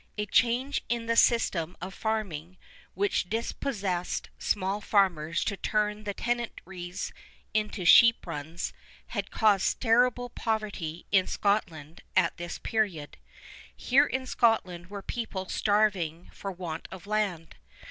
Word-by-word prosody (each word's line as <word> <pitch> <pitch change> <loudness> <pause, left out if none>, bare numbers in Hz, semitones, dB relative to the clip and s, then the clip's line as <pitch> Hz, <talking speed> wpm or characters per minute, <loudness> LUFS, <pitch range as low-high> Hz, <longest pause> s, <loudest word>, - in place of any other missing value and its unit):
A 210 - -1
change 245 +7 +2
in 235 -1 -1
the 230 0 +1
system 185 -8 +3
of 185 +2 -6
farming, 185 -7 -3 0.4
which 200 -2 0
dispossessed 205 -5 -2
small 200 +1 0
farmers 170 -6 +2
to 200 - -1
turn 210 +1 -1
the 205 - -2
tenantries 190 -6 -4 0.4
into 210 -3 -1
sheep 235 +4 +7
runs, 165 +1 -5 0.4
had - - -3
caused 210 -4 +2
terrible 245 +1 +3
poverty 205 -9 -3
in 190 -2 +4
Scotland 170 -7 -1
at 185 -3 +3
this 175 0 -5
period. 195 -10 -2 0.6
Here 255 - +4
in 260 0 -2
Scotland 190 -9 +1
were 200 -1 -7
people 195 -6 -4
starving 195 -6 +1
for 195 - -5
want 170 -3 -6
of 190 0 -10
land. 200 -6 -2
200 Hz, 125 wpm, -28 LUFS, 175-220 Hz, 0.6 s, sheep